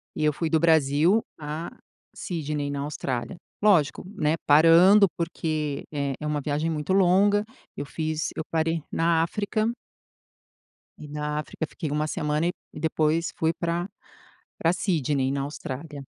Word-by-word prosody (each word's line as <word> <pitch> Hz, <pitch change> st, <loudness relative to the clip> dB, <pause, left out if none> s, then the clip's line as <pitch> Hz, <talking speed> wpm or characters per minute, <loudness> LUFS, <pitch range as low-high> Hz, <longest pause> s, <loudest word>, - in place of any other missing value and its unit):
e 155 Hz, -, -2 dB
eu 150 Hz, -, +4 dB
fui 160 Hz, +2 st, -2 dB
do 160 Hz, -, +3 dB
Brasil 160 Hz, +5 st, +4 dB, 0.2 s
a 155 Hz, +2 st, -5 dB, 0.5 s
Sydney, 150 Hz, -4 st, -3 dB
na 140 Hz, -, -3 dB
Austrália. 140 Hz, 0 st, -3 dB, 0.3 s
Lógico, 180 Hz, -10 st, +3 dB
né, 155 Hz, -4 st, +1 dB
parando, 165 Hz, +7 st, +7 dB
porque 155 Hz, -4 st, -2 dB
é 140 Hz, -2 st, -1 dB
é 150 Hz, -, -5 dB
uma 150 Hz, -1 st, 0 dB
viagem 150 Hz, +3 st, -1 dB
muito 150 Hz, +3 st, -1 dB
longa. 195 Hz, +2 st, +4 dB, 0.3 s
Eu 145 Hz, -, -4 dB
fiz 155 Hz, +1 st, -2 dB
eu 160 Hz, -, -2 dB
parei 165 Hz, 0 st, 0 dB
na 165 Hz, 0 st, +2 dB
África. 210 Hz, +6 st, -1 dB, 1.3 s
E 150 Hz, -, -9 dB
na 150 Hz, 0 st, -3 dB
África 155 Hz, +1 st, -4 dB
fiquei 155 Hz, 0 st, -5 dB
uma 150 Hz, +1 st, 0 dB
semana 150 Hz, +2 st, 0 dB
e -, -, +1 dB, 0.2 s
e -, -, -6 dB
depois 160 Hz, +1 st, +1 dB
fui 160 Hz, 0 st, +1 dB
pra 170 Hz, +1 st, -2 dB, 0.7 s
pra 165 Hz, +1 st, +2 dB
Sydney, 145 Hz, -8 st, 0 dB
na 140 Hz, 0 st, -1 dB
Austrália. 145 Hz, +1 st, -6 dB
155 Hz, 150 wpm, -26 LUFS, 150-170 Hz, 1.3 s, parando